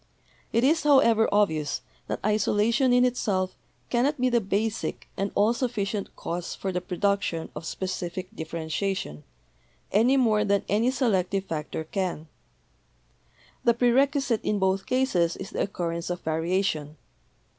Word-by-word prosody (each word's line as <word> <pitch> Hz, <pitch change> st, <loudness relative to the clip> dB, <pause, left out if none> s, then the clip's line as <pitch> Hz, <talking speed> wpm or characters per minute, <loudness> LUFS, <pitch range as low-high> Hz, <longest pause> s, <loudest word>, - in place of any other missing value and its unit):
It 230 Hz, +2 st, +2 dB
is, 315 Hz, +5 st, +4 dB
however, 265 Hz, -7 st, +5 dB
obvious 160 Hz, -9 st, +1 dB, 0.3 s
that -, -, -3 dB
isolation 215 Hz, +4 st, +2 dB
in 245 Hz, 0 st, +5 dB
itself 195 Hz, -7 st, 0 dB, 0.4 s
cannot 260 Hz, +4 st, +1 dB
be 255 Hz, 0 st, +3 dB
the 235 Hz, -1 st, +3 dB
basic 210 Hz, +3 st, -2 dB
and 195 Hz, 0 st, -2 dB
all 215 Hz, +3 st, +4 dB
sufficient 220 Hz, -5 st, -2 dB
cause 175 Hz, +1 st, -4 dB
for 190 Hz, -, -3 dB
the 180 Hz, 0 st, -2 dB
produc 200 Hz, +3 st, 0 dB
tion 165 Hz, -3 st, -3 dB
of 155 Hz, +2 st, -6 dB
specific 185 Hz, -1 st, -4 dB
differentiation, 160 Hz, -, -3 dB, 0.7 s
any 240 Hz, +7 st, +4 dB
more 220 Hz, -5 st, +3 dB
than 200 Hz, -1 st, +1 dB
any 220 Hz, +5 st, +2 dB
selective 195 Hz, -7 st, 0 dB
factor 160 Hz, -2 st, -4 dB
can. 175 Hz, -2 st, -3 dB, 1.4 s
The 235 Hz, -, +4 dB
prerequisite 260 Hz, 0 st, +2 dB
in 210 Hz, -, 0 dB
both 190 Hz, 0 st, 0 dB
cases 195 Hz, -11 st, +1 dB
is 190 Hz, -, -7 dB
the -, -, -2 dB
occur 180 Hz, -4 st, -2 dB
rence 170 Hz, +1 st, -4 dB
of 175 Hz, 0 st, -3 dB
variation. 160 Hz, -2 st, -1 dB
200 Hz, 140 wpm, -26 LUFS, 175-235 Hz, 1.4 s, however